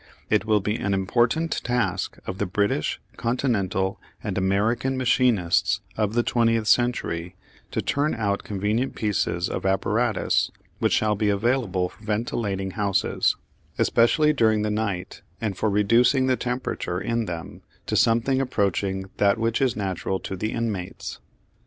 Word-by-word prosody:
It 100 - +3
will 105 -2 +3
be 105 +3 -1
an 100 0 0
important 120 +11 +1
task 125 -1 -1
of 95 - -5
the 100 - 0
British, 100 -4 0 0.2
Continental 100 -6 0 0.2
and 100 -3 -3
American 105 +7 +1
machinists 115 -8 +2
of 110 0 -1
the 120 - +3
twentieth 115 -2 +2
century 95 -8 +1 0.3
to - - -2
turn 145 +2 0
out 100 -3 -1
convenient 105 +6 -1
pieces 90 -5 0
of - - -4
apparatus 105 +3 +1 0.3
which - - +2
shall 105 -1 +2
be 105 0 +1
available 100 -4 +1
for 110 - -19
ventilating 105 -3 -2
houses, 100 -3 +1 0.4
especially 150 +6 +4
during 110 -6 +3
the 105 - 0
night, 105 -4 -3 0.2
and 105 -4 -2
for 110 - 0
reducing 115 +6 +4
the 130 0 +3
temperature 125 -8 -3
in 115 +2 -1
them 85 -4 -6 0.2
to 110 - -2
something 115 +5 +3
approaching 100 -5 -1
that 100 +1 +3
which 115 +3 0
is 130 -4 +2
natural 95 -1 -2
to 95 - -5
the 110 +4 -2
inmates. 100 -5 -4
105 Hz, 145 wpm, -24 LUFS, 95-120 Hz, 0.4 s, especially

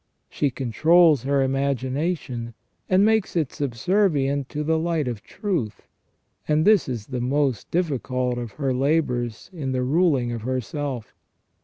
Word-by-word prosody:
She 145 - 0
controls 150 +5 +4
her 140 +1 +1
imagination, 135 -2 -2 0.3
and 190 +2 +5
makes 220 -3 +1
it 155 -6 0
subservient 140 - 0
to 150 - -3
the 160 +1 +1
light 165 -4 -1
of 115 -4 -4
truth; 150 - -3 0.6
and 155 +1 +2
this 210 -8 +4
is 115 -5 -4
the 125 -1 -4
most 135 -1 0
difficult 130 -7 -1
of 120 -4 -6
her 135 0 -1
labours 125 - -1
in 140 -6 -3
the 125 0 0
ruling 140 -3 +2
of 115 -2 -4
herself. 130 0 -4
140 Hz, 140 wpm, -24 LUFS, 125-160 Hz, 0.6 s, and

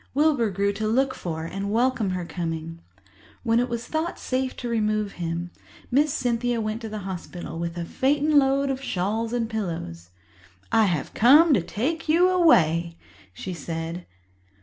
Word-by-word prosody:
Wilbur 285 -6 +3
grew 200 +1 0
to 215 +2 -2
look 260 +4 +2
for 160 -2 -5
and 195 +4 -4
welcome 235 -2 +1
her 180 -1 -3
coming. 165 -1 -5 0.6
When 230 -1 +3
it 245 +1 0
was 235 0 -3
thought 320 +2 -2
safe 260 0 -2
to 245 - -5
remove 215 -3 0
him, 170 +1 -3 0.4
Miss 290 +4 +3
Cynthia 245 -4 0
went 215 +1 -3
to 225 - -5
the 215 - -5
hospital 175 -2 -6
with 170 0 -4
a 170 - -3
phaeton 290 - +3
load 275 0 +2
of 265 0 -4
shawls 220 +1 -1
and 240 -2 -1
pillows. 165 - -5 0.6
"I 225 -1 +5
have 175 -8 -1
come 290 +7 +6
to 200 - +3
take 305 - -3
you 350 +4 +5
away," 170 - +3 0.3
she 180 - -6
said. 165 +2 -5
220 Hz, 165 wpm, -25 LUFS, 175-260 Hz, 0.6 s, come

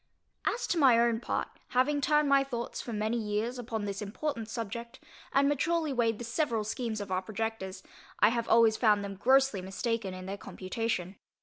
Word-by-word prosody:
As 480 - 0
to 345 - 0
my 260 -5 +6
own 235 -1 +3
part, - - -2 0.3
having 285 +3 +3
turned 300 +1 +3
my 275 -1 +5
thoughts 240 -3 -4
for 240 - -7
many 215 +2 -1
years 220 +3 -2
upon 225 -3 -3
this 200 0 -4
important 225 +2 -4
subject, 235 +2 -5 0.3
and 275 +1 +4
maturely 310 +1 +1
weighed 230 -3 +1
the 240 - -6
several 230 -2 0
schemes 225 0 -3
of 200 - -6
our 185 0 +1
projectors, 195 -2 -4 0.4
I - - +6
have 235 0 -1
always 225 -1 +5
found 210 -3 +3
them 200 0 -5
grossly 260 0 +3
mistaken 195 +1 -2
in 185 0 -8
their 195 +1 -4
computation. 190 -1 -3
230 Hz, 185 wpm, -30 LUFS, 210-260 Hz, 0.4 s, my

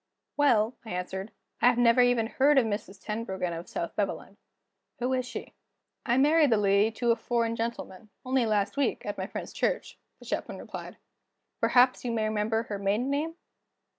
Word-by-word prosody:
"Well," 245 -5 +3
I 225 - -10
answered; 190 +3 -4 0.3
"I 245 0 +5
never 240 0 +5
even 245 -2 +3
heard 275 +5 +3
of 260 - +5
Mrs. 205 -2 -4
Tenbruggen, 190 -5 -3
of 165 +1 -7
South 170 - -4
Beveland. 200 0 -3 0.6
Who 250 +2 -1
is 255 -1 -1
she?" - - -7 0.5
"I 240 +1 +3
married 300 +2 +5
the 225 - +4
lady 200 +1 +3
to 235 +1 +1
a - - +4
foreign 230 0 -1
gentleman, 225 -3 -5 0.2
only 255 -2 +1
last 210 +3 0
week, 280 -4 0
at 205 -1 -4
my 190 - -3
friend's - - -7
church," - - -2 0.2
the - - -16
Chaplain - - -3
replied. - - -8 0.6
"Perhaps 250 +1 +4
you 245 - -2
may 225 -1 0
remember 215 +1 0
her 205 -3 -5
maiden 210 +7 0
name?" 310 +4 -1
230 Hz, 175 wpm, -28 LUFS, 205-250 Hz, 0.6 s, I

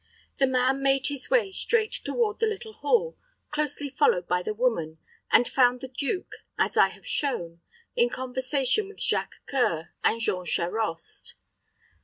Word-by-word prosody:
The 270 - +4
man 260 +1 +2
made 270 +1 +2
his 285 -2 -1
way 475 -6 +3
straight 435 +2 +1
toward 445 -3 -1
the 450 - +2
little 435 +1 -5
hall, 485 +1 0 0.3
closely 295 -1 -1
followed 260 - +2
by 180 0 +1
the 180 - -3
woman, 210 -9 -1 0.3
and 245 - +6
found 250 -1 +3
the 260 - -5
duke, 280 +8 -3 0.3
as - - +1
I - - +6
have - - -14
shown, 170 - -2 0.3
in 480 0 +3
conversation 260 - 0
with 405 0 -13
Jacques - - 0
C[oe]ur 170 - 0
and 230 - +2
Jean 185 -5 -1
Charost. 175 +1 -2
265 Hz, 155 wpm, -27 LUFS, -, 0.3 s, and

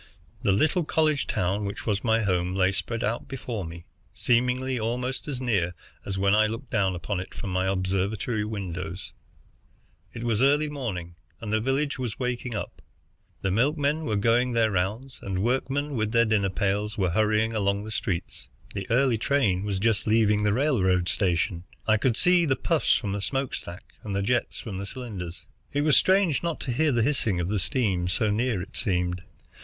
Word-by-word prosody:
The - - +2
little 155 - +2
college 155 -2 +1
town 95 +3 0
which 100 0 -5
was 100 -3 0
my 115 -1 +2
home 90 -2 0
lay 95 -1 +3
spread 115 +4 -2
out 115 +2 -2
before 125 -5 -4
me, 85 0 -8 0.3
seemingly 125 +1 +1
almost 125 +5 -2
as 135 -4 -3
near 100 -9 0 0.3
as 95 -1 -3
when 100 +1 +3
I 110 +1 +5
looked 115 +4 -6
down 95 -4 +1
upon 90 +2 -3
it 90 - -8
from 100 - -5
my 95 +1 0
observatory 95 +4 -1
windows. 95 -4 -5 1.0
It 115 - -7
was 115 -1 +1
early 145 +3 +4
morning, 95 -12 -5 0.2
and 110 -2 -4
the 110 - +3
village 135 +4 0
was 120 -4 -3
waking 125 -2 -3
up. - - -5 0.6
The 95 - +1
milkmen 145 - +1
were 110 - 0
going 120 +4 +2
their 115 -2 +3
rounds, 105 +8 -2
and 95 -1 -2
workmen, 135 +4 0
with 110 -3 -1
their 115 0 +5
dinner 105 -3 +2
pails, 100 +2 -1
where 95 -4 +1
hurrying 110 +3 +2
along 100 -1 0
the 110 - -7
streets. 95 -4 -3 0.3
The 95 -1 -5
early 125 -1 +3
train 105 -8 +1
was 100 -2 -1
just 110 +1 +1
leaving 105 -1 +3
the 105 - +3
railroad 95 - +2
station. 90 -2 0 0.2
I 110 0 +4
could 115 +1 +1
see 180 -1 +4
the 135 -4 +2
puffs 165 +1 +2
from 100 - -1
the 100 0 -2
smoke 135 +4 -2
stack, 85 +3 -8
and 100 -2 -4
the 100 - 0
jets 120 +4 0
from 100 -5 -6
the 100 - -5
cylinders. 100 -9 -7 0.3
It 145 - +1
was 150 -1 +4
strange 190 -5 +4
not 170 -2 -2
to 130 - -3
hear 150 +5 +2
the 120 -3 +2
hissing 115 -8 +1
of 85 +1 -1
the 105 0 0
steam, 95 - 0
so 105 +4 +1
near 110 -3 0
I - - -6
seemed. 90 -4 0
110 Hz, 190 wpm, -26 LUFS, 95-125 Hz, 1.0 s, I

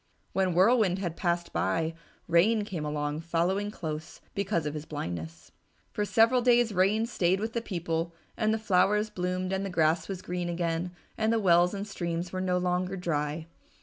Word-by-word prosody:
When 185 -3 +1
Whirlwind 195 -1 +4
had 175 -4 -3
passed 175 -1 -1
by, 165 0 0 0.3
Rain 205 +6 +4
came 180 -7 -4
along 150 0 -2
following 175 +5 0
close, 160 -5 -6
because 195 -5 -1
of 150 - -2
his 150 0 -5
blindness. 85 - -6 0.4
For 210 - -1
several 230 +3 +4
days 240 -2 +4
Rain 200 +4 +3
stayed 190 -5 +1
with 220 +2 -3
the 235 - -1
people 170 -5 -2 0.2
and 215 -1 +1
the 220 - +2
flowers 210 +1 +2
bloomed 185 0 -2
and 190 +1 -1
the 195 - -3
grass 160 -1 +2
was 190 -2 -5
green 180 0 -3
again 170 0 -1 0.3
and 220 0 +2
the 230 - +3
wells 180 -2 +4
and 200 +1 -4
streams 175 -2 -3
were 185 - -2
no 180 -1 +1
longer 180 +1 0
dry. 155 -2 -2
180 Hz, 180 wpm, -29 LUFS, 165-205 Hz, 0.4 s, Whirlwind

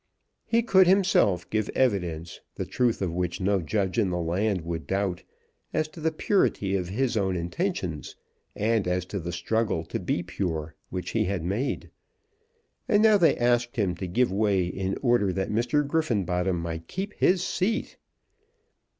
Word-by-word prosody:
He 230 0 +2
could 190 -5 +5
himself 180 - +3
give 110 -1 0
evidence, 90 -10 0 0.2
the 95 - -3
truth 115 +3 0
of 85 -3 -2
which 90 -1 -2
no 100 0 +1
judge 95 +6 -1
in 100 -4 +2
the 90 - -1
land 90 +3 0
would 85 0 -5
doubt, 95 -2 -1 0.5
as 155 -1 +1
to 160 - -12
the 160 +1 +1
purity 155 - +1
of 90 -2 -2
his 120 +5 0
own 95 -3 +1
intentions, 90 - -3 0.4
and 110 -2 +1
as 90 0 0
to 95 +2 -4
the 85 0 -4
struggle 95 +1 -1
to - - -4
be 85 - -1
pure 80 -4 -3 0.2
which 90 -1 -4
he 110 -2 +1
had 95 -3 -2
made. 100 +10 -2 1.0
And 210 0 +4
now 215 -2 +7
they 170 - +4
asked 120 +1 +1
him 100 -7 +1
to 95 - -4
give 120 +5 +1
way 100 -2 +2
in 95 +2 -3
order 120 -6 +3
that 95 +1 -2
Mr. 120 +7 +1
Griffenbottom 95 - 0
might 80 0 -5
keep 200 +3 -4
his 180 -1 +2
seat! 215 +5 -1
100 Hz, 165 wpm, -26 LUFS, 90-125 Hz, 1.0 s, now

